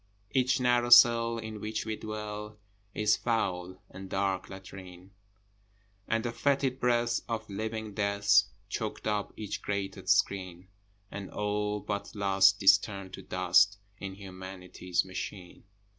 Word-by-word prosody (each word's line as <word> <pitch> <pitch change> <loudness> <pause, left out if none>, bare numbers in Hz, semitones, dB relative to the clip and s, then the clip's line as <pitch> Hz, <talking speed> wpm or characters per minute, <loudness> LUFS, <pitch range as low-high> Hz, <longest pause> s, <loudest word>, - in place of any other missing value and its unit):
Each 130 -1 +2
narrow 120 -1 +2
cell 115 -1 +7
in 110 -2 -7
which 110 0 -3
we 110 -1 -2
dwell 105 -1 -6 0.4
Is 105 0 +3
foul 95 -6 -2
and 95 0 -9
dark 95 -1 -1
latrine, 95 -1 -11 1.0
And 115 +1 0
the 120 - -1
fetid 135 0 0
breath 120 -1 +2
of 115 -1 -3
living 110 +1 -4
Death 100 -1 +3 0.2
Chokes 110 +1 -4
up 105 -1 -1
each 105 -2 -5
grated 95 -2 -4
screen, 95 -3 +1 0.4
And 100 -2 -6
all, 105 0 -2
but 100 +2 -5
Lust, 100 0 +4
is 95 +1 +8
turned 100 -2 -8
to - - -7
dust 105 0 +3 0.2
In 95 -1 -6
Humanity's 95 -2 -4
machine. 95 -1 -7
105 Hz, 130 wpm, -30 LUFS, 95-110 Hz, 1.0 s, is